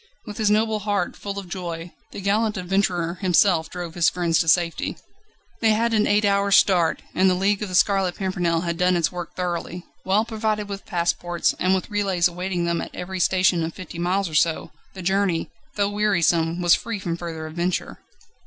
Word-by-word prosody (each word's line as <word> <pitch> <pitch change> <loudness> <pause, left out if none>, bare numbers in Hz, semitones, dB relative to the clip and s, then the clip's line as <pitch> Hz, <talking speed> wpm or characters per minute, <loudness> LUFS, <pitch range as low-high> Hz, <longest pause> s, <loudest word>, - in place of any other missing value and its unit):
With 210 -2 -8
his 215 -2 +2
noble 215 +1 +2
heart 205 -3 -1
full 200 -1 -6
of 195 -2 -6
joy, 175 -2 -6 0.2
the - - -7
gallant 210 +2 +1
adventurer 180 -2 -1
himself 180 -2 +3
drove 175 -2 -6
his 170 -2 +3
friends 170 -2 0
to 165 - 0
safety. 170 +1 +1 0.6
They 220 -1 +3
had 230 +2 +1
an 215 -1 +3
eight 205 +1 +3
hours' 200 0 +3
start, 175 -4 +3
and 190 +1 +3
The 185 - +2
League 195 +2 +1
of 210 - -3
The 185 - -3
Scarlet 190 -1 +2
Pimpernel 175 -4 -1
had 170 -1 -3
done 180 0 +3
its 170 - +1
work 175 -2 -7
thoroughly: 175 0 -4 0.2
well 205 +4 +2
provided 215 -2 -2
with 200 -1 -7
passports, 175 -1 0
and 185 +1 +3
with 190 +3 -4
relays 195 -4 +2
awaiting 180 0 -3
them 170 -1 0
at - - -8
every 185 +1 -5
station 185 -1 +2
of 160 0 -4
fifty 170 -2 -8
miles 185 +3 0
or 160 - -9
so, 160 +1 +1 0.2
the 185 - -7
journey, 190 -2 0 0.2
though 205 -1 0
wearisome 175 -5 +1
was 175 - +6
free 230 -2 -1
from 175 -4 -3
further 165 -2 -6
adventure. 175 +3 -3
185 Hz, 195 wpm, -23 LUFS, 170-200 Hz, 0.6 s, was